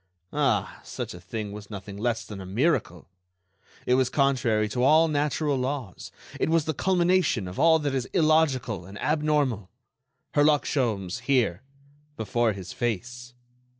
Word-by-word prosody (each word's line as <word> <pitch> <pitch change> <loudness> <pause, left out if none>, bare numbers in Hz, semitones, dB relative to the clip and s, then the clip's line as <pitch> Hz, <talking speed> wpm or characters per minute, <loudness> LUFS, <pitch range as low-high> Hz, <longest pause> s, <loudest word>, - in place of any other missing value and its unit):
Ah! - - 0
such - - -6
a 90 - -10
thing 105 +3 -5
was 105 0 -9
nothing 100 -1 -8
less 115 +2 -2
than 100 -2 -8
a - - -8
miracle; 100 - 0 0.8
it 125 - +2
was 130 -1 +3
contrary 120 -7 +1
to 125 +4 -2
all 155 +5 +5
natural 150 -1 0
laws; 130 -6 -4 0.3
it - - +1
was 165 -2 +2
the 155 - -1
culmination 180 - +1
of 90 - -7
all 165 0 +6
that 145 -3 -2
is 130 -2 -1
illogical 150 - +2
and 100 +1 -10
abnormal.... 150 - 0 0.6
Herlock 145 0 +3
Sholmes 110 - -1
here—before 135 0 -2
his 95 -2 -8
face! 120 +2 -4
125 Hz, 145 wpm, -26 LUFS, 105-150 Hz, 0.8 s, all